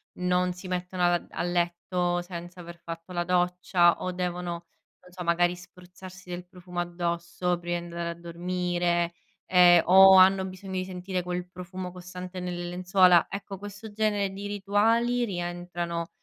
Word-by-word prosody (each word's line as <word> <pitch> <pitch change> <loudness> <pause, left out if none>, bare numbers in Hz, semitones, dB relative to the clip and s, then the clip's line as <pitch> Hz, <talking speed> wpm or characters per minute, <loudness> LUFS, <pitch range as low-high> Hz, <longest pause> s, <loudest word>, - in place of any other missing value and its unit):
non 180 0 +1
si 180 +1 -9
mettono 180 0 -3
ad 175 0 +1
a - - -4
letto 175 0 0
senza 175 0 -9
aver 170 0 -9
fatto 165 +2 -8
la 175 0 0
doccia 180 0 +2
o 185 - -2
devono, 180 -1 -3
non 170 +1 -12
so, 180 0 -7
magari 175 +1 +2
spruzzarsi 180 +1 -13
del 175 0 -6
profumo 180 0 -6
addosso 175 0 -2
prima 175 0 -3
di - - -8
andare 170 0 -4
a - - -3
dormire, 175 0 -1 0.3
ehm 175 -2 +6
o 190 +1 +8
hanno 190 +1 +6
bisogno 190 0 -8
di 185 - -1
sentire 185 0 -4
quel 180 0 -4
profumo 180 0 -7
costante 180 0 -8
nelle 175 -1 -4
lenzuola. 180 -1 +4
Ecco, 200 -1 -6
questo 205 +2 -9
genere 205 -2 0
di 200 +1 -6
rituali 225 +5 +1
rientrano 175 -3 -4
180 Hz, 155 wpm, -27 LUFS, 175-185 Hz, 0.3 s, o